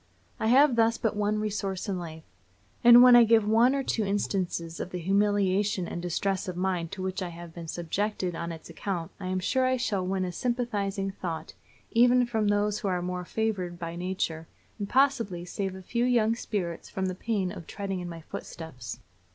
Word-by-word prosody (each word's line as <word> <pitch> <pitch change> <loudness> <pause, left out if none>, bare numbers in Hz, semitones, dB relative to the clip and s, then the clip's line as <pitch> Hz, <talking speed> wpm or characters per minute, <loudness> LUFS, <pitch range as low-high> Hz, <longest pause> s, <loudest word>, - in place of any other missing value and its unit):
I 220 - 0
have 260 +1 +5
thus 230 0 +3
but 220 -2 -1
one 210 +1 0
resource 205 -2 -2
in 190 -3 -2
life; 160 -2 -8 0.6
and 240 +1 +10
when 250 -1 +9
I 240 - +9
give 225 -2 +4
one 235 +5 +4
or 275 - 0
two 225 - 0
instances 185 -4 -2
of - - -4
the 180 - -5
humiliation 195 0 +1
and 170 - -5
distress 190 +3 -1
of 180 -1 -4
mind 180 -3 -1
to 190 - -5
which 190 +1 -3
I 180 - -3
have 170 -1 -10
been 170 -1 -8
subjected 180 +3 -2
on 170 +1 -4
its 160 -1 -9
account 175 -5 -4
I 185 - -5
am 185 0 -1
sure 260 +8 +1
I 255 0 +2
shall 210 -7 -1
win 185 0 -1
a 180 - -3
sympathizing 205 -4 -2
thought 165 -4 -5 0.4
even 245 +1 +5
from 220 -3 0
those 205 0 +1
who 210 - -3
are 180 -2 0
more 180 0 -3
favored 190 -5 -2
by 170 -1 -5
nature, 175 -3 -3 0.3
and 200 -1 -4
possibly 240 -10 +2
save 190 +1 -3
a 190 - -10
few 235 +5 -1
young 230 -3 +3
spirits 195 -7 -4
from 190 - -2
the 185 - -1
pain 190 -1 -1
of 180 -5 -9
treading 195 -2 -4
in 175 -1 -5
my 165 -1 -8
footsteps. 130 -8 -8
195 Hz, 200 wpm, -28 LUFS, 175-220 Hz, 0.6 s, and